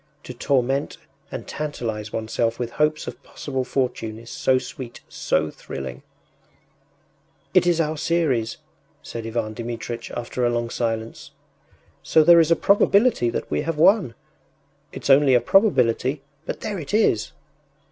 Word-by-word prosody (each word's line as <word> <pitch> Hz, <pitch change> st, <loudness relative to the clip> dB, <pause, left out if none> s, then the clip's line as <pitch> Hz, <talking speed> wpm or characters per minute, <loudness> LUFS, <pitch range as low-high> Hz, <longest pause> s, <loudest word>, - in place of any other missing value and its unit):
To 125 Hz, -, -8 dB
torment 135 Hz, +2 st, 0 dB, 0.3 s
and -, -, -6 dB
tantalize 115 Hz, -8 st, -4 dB
oneself 115 Hz, +1 st, -1 dB
with 120 Hz, -1 st, -4 dB
hopes 150 Hz, +2 st, 0 dB
of -, -, -8 dB
possible 130 Hz, -3 st, -4 dB
fortune 125 Hz, -4 st, -2 dB
is 115 Hz, +1 st, -11 dB
so 130 Hz, -, +2 dB
sweet, 130 Hz, -1 st, -7 dB
so 80 Hz, 0 st, -1 dB
thrilling! 65 Hz, -2 st, -7 dB, 1.5 s
“It 180 Hz, -1 st, +4 dB
is 170 Hz, -1 st, +3 dB
our 155 Hz, -1 st, 0 dB
series,” 145 Hz, -9 st, 0 dB, 0.5 s
said 115 Hz, -1 st, -6 dB
Ivan 110 Hz, -1 st, -2 dB
Dmitritch, 115 Hz, +1 st, -5 dB
after 120 Hz, +1 st, -4 dB
a 120 Hz, -, +3 dB
long 120 Hz, -1 st, -2 dB
silence. 115 Hz, -1 st, -3 dB, 0.7 s
“So 160 Hz, -, +4 dB
there 170 Hz, +2 st, +8 dB
is 165 Hz, -1 st, +4 dB
a 165 Hz, -, +5 dB
probability 200 Hz, -, +3 dB
that -, -, -4 dB
we -, -, +1 dB
have 160 Hz, 0 st, -3 dB
won. 175 Hz, -, +4 dB, 0.8 s
It’s -, -, -1 dB
only 135 Hz, -1 st, +6 dB
a -, -, +6 dB
probability, 130 Hz, -, +2 dB, 0.2 s
but -, -, -4 dB
there 205 Hz, -3 st, -3 dB
it 155 Hz, +5 st, -3 dB
is! 115 Hz, -, +2 dB
125 Hz, 145 wpm, -23 LUFS, 115-155 Hz, 1.5 s, there